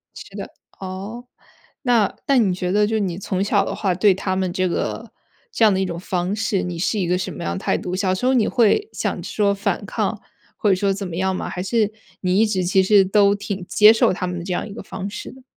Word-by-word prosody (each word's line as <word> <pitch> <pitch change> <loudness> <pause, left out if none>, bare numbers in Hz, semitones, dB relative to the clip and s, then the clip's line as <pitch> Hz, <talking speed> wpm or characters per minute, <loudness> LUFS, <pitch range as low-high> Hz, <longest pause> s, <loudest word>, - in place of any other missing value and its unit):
是 - - -11
的， - - -6 0.3
哦， 195 +5 -7 0.6
那 235 -6 +2
那 275 - +4
你 205 -6 +3
觉 180 0 -2
得 210 +2 +3
就 220 +1 0
你 185 -4 -2
从 190 -1 -2
小 205 - +2
的 - - -4
话 195 -3 0
对 195 +2 +4
他 190 0 -2
们 185 -1 -1
这 185 +1 0
个 220 +5 -3 0.4
这 235 - +1
样 215 - +7
的 190 - 0
一 190 - +1
种 170 -2 -5
方 180 +1 -2
式， 210 -3 -1
你 175 -2 -5
是 205 +5 0
一 185 - 0
个 180 - +2
什 185 0 -4
么 150 - -7
样 85 +1 -2
态 - - 0
度？ 180 0 -4
小 185 -1 +1
时 185 +7 -2
候 260 - +3
你 240 -4 +3
会 255 - +2
想 - - -3
说 200 -2 +1
反 200 +1 -2
抗 - - -2 0.4
或 210 - +1
者 190 - +5
说 195 +1 +1
怎 195 0 -3
么 170 - -6
样 190 0 0
吗？ - - -4
还 180 - -4
是 210 +2 +1 0.3
你 185 +1 +2
一 220 - +5
直 190 -3 0
其 190 +2 +3
实 195 0 +5
都 200 +1 +4
挺 200 -2 -5
接 210 +1 +7
受 225 - +3
他 180 - -3
们 180 -1 -4
这 180 - -5
样 180 - -2
一 205 - -9
个 - - -8
方 190 0 -6
式 210 - -7
的？ 260 0 -16
195 Hz, 275 characters per minute, -21 LUFS, 185-210 Hz, 0.6 s, 样